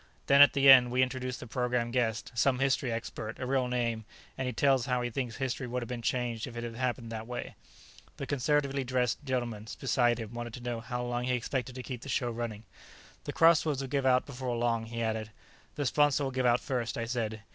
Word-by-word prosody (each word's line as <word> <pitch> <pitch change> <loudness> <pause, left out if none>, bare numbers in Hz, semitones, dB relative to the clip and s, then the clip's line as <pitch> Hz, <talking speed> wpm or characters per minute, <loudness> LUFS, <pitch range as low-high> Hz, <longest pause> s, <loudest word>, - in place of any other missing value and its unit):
Then, 140 0 +6
at 145 - +8
the 140 -1 +3
end, 130 -2 +9
we 125 +1 +3
introduce 130 -1 -3
the - - -9
program 120 0 -1
guest, 120 -1 -1
some 125 +2 +2
history 135 -1 +1
expert, 110 -1 -5
a 130 - -4
real 130 -1 +1
name, 120 -3 -1 0.3
and 130 - -3
he - - -1
tells 135 +1 +2
how 125 -1 0
he 120 - -2
thinks 120 -1 -3
history 130 -1 -3
would 125 0 -3
have - - -7
been 120 0 -5
changed 120 -1 -1
if 120 -2 -9
it 120 - -4
had 120 -1 -5
happened 120 -1 -3
this 110 -1 -4
way." 120 +2 -6 0.6
The 140 - -4
conservatively 140 0 0
dressed 125 +1 0
gentleman 120 -5 -3
beside 120 -3 +2
him 110 0 -6
wanted 120 -1 -5
to - - -8
know 120 -1 -3
how 125 +2 -4
long 120 0 -2
he 125 - 0
expected 125 +1 -3
to 130 - -6
keep 125 -3 -6
the 140 - -9
show 125 -2 0
running. 115 -2 -5 0.6
"The - - -4
crossroads 160 -4 +4
will 135 - -5
give 135 0 0
out 125 0 +4
before 130 -3 -4
long," 115 -1 0
he 115 0 -3
added. 110 -1 -2 0.5
"The 145 - -2
sponsor'll 145 +1 +2
give 130 -1 +1
out 120 0 +3
first," 125 -4 -2
I 115 - -2
said. 110 -3 -3
125 Hz, 225 wpm, -30 LUFS, 120-130 Hz, 0.6 s, end